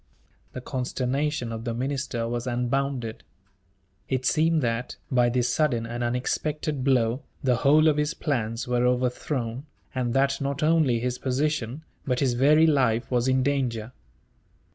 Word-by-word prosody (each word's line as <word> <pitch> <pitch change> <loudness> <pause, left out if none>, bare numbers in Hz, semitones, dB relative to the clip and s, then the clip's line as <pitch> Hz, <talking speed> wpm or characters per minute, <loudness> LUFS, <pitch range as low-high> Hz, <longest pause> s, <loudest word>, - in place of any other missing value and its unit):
The 130 - -6
consternation 130 +1 -2
of 115 0 -5
the 115 -1 -3
minister 130 -2 -2
was 120 +1 -3
unbounded. 125 -1 -1 0.9
It 130 -1 -1
seemed 160 +2 +2
that, 115 +1 -2 0.2
by 125 -2 +4
this 125 0 +1
sudden 125 -7 +1
and 120 +1 -4
unexpected 135 +4 -2
blow, 125 -1 +2 0.2
the 125 -3 +2
whole 150 +5 +5
of 150 -1 +3
his 150 +1 0
plans 115 -5 -2
were 125 0 +2
overthrown; 125 +1 -1 0.3
and 125 -2 -1
that 135 +1 +2
not 140 +2 -2
only 155 -7 +3
his 125 +1 -2
position, 135 0 -1 0.2
but 125 -2 -1
his 130 -3 +2
very 150 +6 +5
life, 130 -7 +2
was 125 0 +1
in 130 0 +2
danger. 125 -5 -1
130 Hz, 145 wpm, -26 LUFS, 120-140 Hz, 0.9 s, whole